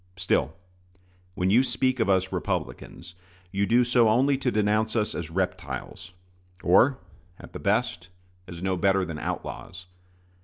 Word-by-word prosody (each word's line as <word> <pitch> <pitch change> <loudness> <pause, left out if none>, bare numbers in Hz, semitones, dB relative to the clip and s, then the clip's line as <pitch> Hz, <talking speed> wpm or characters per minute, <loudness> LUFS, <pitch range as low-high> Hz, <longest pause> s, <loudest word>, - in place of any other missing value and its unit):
Still, 80 -4 0 0.8
when 90 +1 0
you 115 +5 +6
speak 130 -1 0
of 110 - +1
us 95 -1 +2
Republicans, 85 0 -4 0.4
you 100 +1 0
do 120 +2 +4
so 120 -2 +3
only 130 +5 +3
to 130 -1 -1
denounce 110 0 +1
us 110 -2 0
as 85 -2 -5
reptiles, 90 0 -4 0.5
or, 120 +10 +4 0.4
at - - -14
the - - -6
best, 85 +2 -1 0.4
as 85 0 -9
no 95 -1 0
better 95 +1 +2
than 80 -3 -6
outlaws. 90 +4 -6
95 Hz, 145 wpm, -26 LUFS, 90-120 Hz, 0.8 s, you